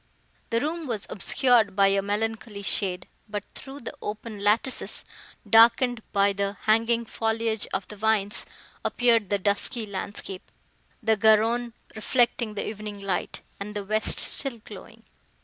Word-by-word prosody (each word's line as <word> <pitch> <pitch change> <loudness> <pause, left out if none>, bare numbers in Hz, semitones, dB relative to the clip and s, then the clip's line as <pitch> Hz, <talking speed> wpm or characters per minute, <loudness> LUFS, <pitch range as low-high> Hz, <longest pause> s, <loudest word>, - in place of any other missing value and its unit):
The 230 - +1
room 315 +4 -3
was 220 -4 -3
obscured 220 0 +3
by 195 -1 +5
a 195 0 +2
melancholy 215 +1 -3
shade; 185 -2 0 0.2
but 205 -1 -4
through 275 +1 -9
the 235 - -6
open 210 0 -6
lattices, 220 +5 0 0.4
darkened 230 +1 +5
by 200 0 +3
the 200 0 -2
hanging 230 +2 +2
foliage 225 -1 -1
of 190 0 -3
the 210 - -9
vines, 210 0 +1 0.4
appeared 230 -5 +2
the 205 - +2
dusky 205 +4 -1
landscape, 195 -1 -7 0.5
the 220 0 +3
Garonne 225 +3 +3 0.2
reflecting 235 0 +1
the - - -3
evening 210 -1 -6
light, 195 -2 -2 0.2
and 210 +1 -6
the 205 -1 -4
west 215 +2 +1
still 270 -4 0
glowing. 205 -3 -12
215 Hz, 140 wpm, -26 LUFS, 200-230 Hz, 0.5 s, by